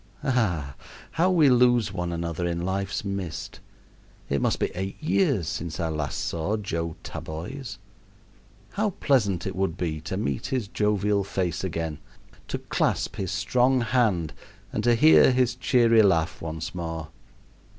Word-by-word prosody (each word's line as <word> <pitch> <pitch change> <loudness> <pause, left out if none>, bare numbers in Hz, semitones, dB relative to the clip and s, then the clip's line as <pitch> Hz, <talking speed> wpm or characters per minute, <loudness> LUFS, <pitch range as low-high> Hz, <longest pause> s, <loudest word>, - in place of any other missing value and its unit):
Ah! 95 - 0 0.4
how 175 +3 +2
we 165 -5 +5
lose 120 -4 +4
one 90 -2 -2
another 85 0 -2
in 85 0 -2
life's 95 +2 -2
mist. 95 -6 -5 0.7
It 70 -1 0
must - - +1
be - - -1
eight 95 +2 -4
years 145 - +1
since 80 -1 -4
I 85 -1 0
last 75 -3 -3
saw 85 +6 -1
Joseph 85 -5 -4
Taboys. 105 - -6 0.9
How 215 +1 0
pleasant 105 - +2
it 95 - -3
would 95 -2 -1
be 80 -4 -2
to 95 - -4
meet 70 - -2
his 130 -6 -1
jovial 105 -1 +1
face 90 -4 -2
again, 80 -4 -3 0.5
to - - -2
clasp - - -1
his 95 -1 -3
strong 125 +5 +2
hand, 110 -10 +1 0.4
and - - -1
to 120 -1 +5
hear 150 +1 +7
his 125 -2 +2
cheery 120 -2 +4
laugh 85 -6 +2
once 80 -1 -5
more! 80 -3 -5
95 Hz, 150 wpm, -26 LUFS, 85-120 Hz, 0.9 s, hear